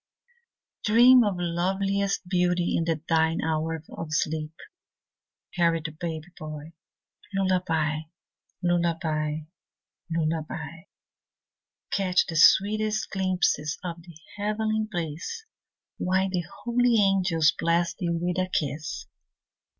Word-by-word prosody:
Dream 240 +3 +7
of 205 -3 0
loveliest 195 +3 -1
beauty 180 -1 +1
in 165 - +1 0.2
thine 160 0 +2
hour 160 0 -1
of 165 - -5
sleep, 155 0 -1 1.0
Harold, 165 -2 +1
baby 160 -2 -4
boy. 155 +1 -8 0.6
Lullaby, 170 -5 +1 0.6
lullaby, 160 -3 0 0.7
lullaby. 160 0 -3 1.1
Catch 185 -2 +2
the 165 - -6
sweetest 215 +6 +4
glimpses 185 -5 0
of 170 -1 -5
the 170 -2 -14 0.2
heavenly 215 +1 -1
bliss, 175 - -4 0.6
While 190 +1 +1
the 175 -3 -1 0.2
holy 245 0 +3
angels 190 -6 +3
bless 170 +1 +1
thee 175 -1 -3
with 175 +2 -1
a 185 0 0
kiss. 145 - -3
175 Hz, 95 wpm, -26 LUFS, 160-195 Hz, 1.1 s, Dream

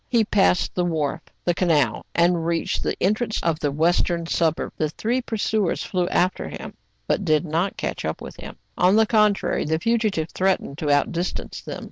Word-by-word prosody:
He 235 -3 +3
passed 195 -3 +2
the 180 - 0
wharf, 160 -2 -1 0.2
the 175 - +3
canal, 155 - +1
and 170 0 +3
reached 165 0 -1
the - - -2
entrance 215 +4 0
of 165 -2 0
the 145 -3 0
western 170 +2 +1
suburb. 165 -1 0
The 155 - -1
three 235 +10 -1
pursuers 220 -5 -1
flew 180 -1 -1
after 185 0 0
him, - - -8 0.3
but - - 0
did 155 -1 +2
not 170 +5 -1
catch - - -3
up - - -3
with - - -9
him: - - -9 0.2
on 180 +3 +4
the 220 0 +5
contrary, 210 -2 +2
the 160 +1 0
fugitive 215 -5 0
threatened 185 -6 0
to 155 -4 -2
out 145 0 +3
distance 175 +2 -4
them. - - -6
175 Hz, 185 wpm, -23 LUFS, 160-205 Hz, 0.3 s, the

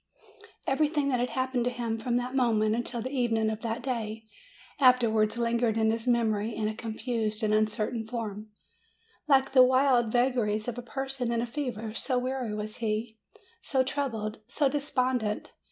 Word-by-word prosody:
Everything 295 +1 +1
that 250 -1 +1
happened 260 -2 -1
to - - +2
him 235 -2 -3
from 240 +2 0
that 245 +1 -3
mo 250 -3 +3
ment 215 0 +2
until 235 0 -3
the 260 - -4
evening 225 -4 +1
of 215 0 -5
that 230 +1 -3
day 225 -4 -3 0.5
ever 275 - +3
afterwards 225 -3 +2
lingered 235 -1 +1
in 220 0 +3
his 225 +2 -3
memory 225 -2 +1
in 215 -1 -1
a 215 - -2
confused 220 -1 -3
and 215 0 +2
uncertain 215 +1 0
form, 215 -2 -5 0.8
like 270 -2 +4
the 265 -1 +7
wild 255 -2 +4
vagaries 240 -3 +1
of 245 0 -3
a - - -4
person 265 0 -3
in 235 - 0
a 235 - 0
fever, 235 -4 -4
so 255 +2 -1
weary 255 -2 -2
was 215 0 -5
he, 220 0 -2 0.4
so 265 -2 +1
troubled, 230 -6 -3
so 280 +3 +1
despondent. 255 -6 -1
235 Hz, 170 wpm, -28 LUFS, 220-255 Hz, 0.8 s, the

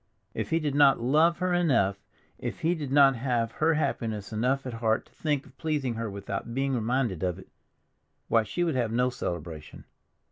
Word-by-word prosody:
If - - -3
he 165 - +2
did 150 -3 -1
not 140 -1 +5
love 155 +8 +3
her 180 0 0
enough, 115 - +2 0.4
if - - -5
he 165 +2 +2
did 150 -6 -5
not 140 -1 +6
have 115 -2 0
her 160 +5 +1
happiness 110 -8 -2
enough 130 +5 0
at 125 - -5
heart 115 -1 0
to - - -25
think 145 -3 -1
of - - -18
pleasing 150 -6 -1
her 115 -1 -3
without 100 +3 -5
being 135 0 0
reminded 120 -5 0
of 90 -2 -1
it—why, 115 +3 -5
she 175 +11 -2
would 165 -2 0
have 120 -4 0
no 125 +2 +1
celebration. 80 -7 -6
125 Hz, 185 wpm, -28 LUFS, 110-145 Hz, 0.4 s, not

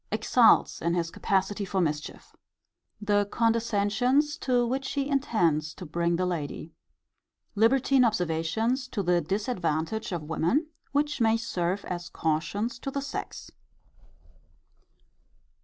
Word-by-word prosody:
Exults - - +4
in 170 +1 0
his 165 -1 -1
capacity 200 +1 0
for 195 0 -2
mischief. 150 -4 -3 0.6
The 205 -1 +1
condescensions 230 +5 +1
to 245 -2 +1
which 270 +3 -2
he 280 -1 -1
intends 175 - +1
to 185 - -8
bring 170 +2 0
the 185 +2 0
lady. 160 -2 -4 0.8
Libertine 255 +4 +3
observations 215 - 0
to 210 -5 -3
the 175 -1 +2
disadvantage 190 - -2
of 170 -3 -3
women; 165 - 0 0.3
which 295 -1 0
may 225 0 +4
serve 190 -4 -2
as 175 -1 -5
cautions 205 +10 -2
to 275 - -4
the 280 - -3
sex. 280 - -6
205 Hz, 120 wpm, -27 LUFS, 170-245 Hz, 0.8 s, Exults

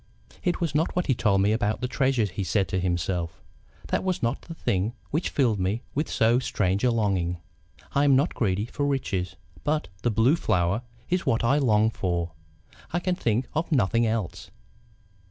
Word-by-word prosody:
"It 180 - 0
was 165 -4 -1
not 155 +3 +1
what 180 - +1
he 135 - +2
told 100 -5 +2
me 105 - +3
about 110 -1 0
the 125 - -1
treasures," 125 -6 +1
he 100 +2 -3
said 95 0 +1
to 95 - 0
himself, 85 -2 -1 0.5
"that - - 0
was 185 -6 -1
not 120 +4 0
the 165 - -9
thing 100 - 0 0.2
which 155 +5 0
filled 120 -7 +1
me 100 +6 -1
with 150 +3 -1
so 115 +2 +3
strange 100 -5 0
a 125 - +5
longing. 95 -7 0 0.6
I 140 - +3
am 140 -2 +5
not 140 +6 +2
greedy 100 -2 0
for 145 +4 -2
riches. 100 -10 -1 0.3
But 150 +1 0
the 120 - +1
Blue 115 +7 +4
Flower 90 - +1 0.3
is 180 0 0
what 115 - +2
I 135 +5 +3
long 110 -4 +3
for. 85 -4 -2 0.6
I 175 - +1
can 180 +1 0
think 120 - 0
of 160 +2 -2
nothing 115 -3 +3
else. 110 -5 -3
115 Hz, 190 wpm, -26 LUFS, 95-140 Hz, 0.6 s, a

